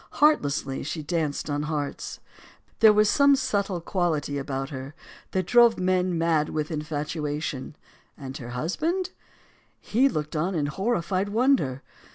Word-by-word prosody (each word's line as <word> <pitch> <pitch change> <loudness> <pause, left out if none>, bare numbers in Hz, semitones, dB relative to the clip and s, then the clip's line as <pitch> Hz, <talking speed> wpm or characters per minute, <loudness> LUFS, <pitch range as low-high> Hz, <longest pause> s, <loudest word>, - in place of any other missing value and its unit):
Heartlessly, 145 - +2
she 155 +2 -4
danced 155 -2 -2
on 145 -1 -1
hearts. 150 -2 -4 0.6
There 220 -1 +8
was 210 0 +4
some 280 +5 +5
subtle 205 -8 -1
quality 160 -6 -1
about 135 0 -4
her 135 +2 -7 0.3
that 185 -1 -1
drove 235 +2 +5
men 185 -1 +1
mad 165 -2 +2
with 155 +1 -3
infatuation. 150 -2 -3 0.4
And 135 -2 -7
her 120 -2 -8
husband? 320 - -1 0.7
He 260 +6 +2
looked 155 - -3
on 175 +5 0
in 150 -3 0
horrified 190 +3 -1
wonder. 220 - +2
165 Hz, 135 wpm, -26 LUFS, 145-205 Hz, 0.7 s, There